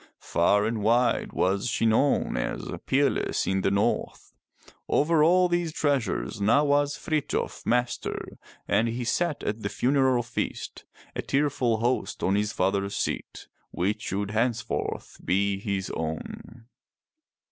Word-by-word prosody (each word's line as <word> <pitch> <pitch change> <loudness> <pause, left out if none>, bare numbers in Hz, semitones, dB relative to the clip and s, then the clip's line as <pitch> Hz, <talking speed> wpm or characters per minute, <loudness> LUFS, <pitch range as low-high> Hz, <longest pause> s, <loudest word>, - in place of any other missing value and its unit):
Far 100 +5 +2
and 110 -1 -1
wide 120 +3 +2
was 95 +4 0
she 115 - 0
known 115 +6 +2
as - - -3 0.2
peerless 140 0 +1
in 95 0 0
the - - +2
North. 100 +1 -1 0.6
Over 150 +1 +3
all 180 +3 +5
these 175 -2 0
treasures 140 - -1
now 115 +9 +4
was 145 0 +2
Frithjof 155 -3 -2
master, 120 0 -1 0.3
and 115 - +2
he 120 +2 -3
sat 160 +6 -1
at 105 +2 -2
the 100 - -2
funeral 130 -1 +2
feast 115 - -5 0.3
a - - -1
tearful 130 -5 0
host 120 +2 -1
on 95 - +2
his 105 +1 +1
father's 100 +1 0
seat - - -3 0.2
which 105 +5 -1
should 100 -1 -3
henceforth 115 +1 -2
be 100 +1 +1
his 100 -2 -3
own. 80 +8 -6
115 Hz, 135 wpm, -26 LUFS, 100-140 Hz, 0.6 s, all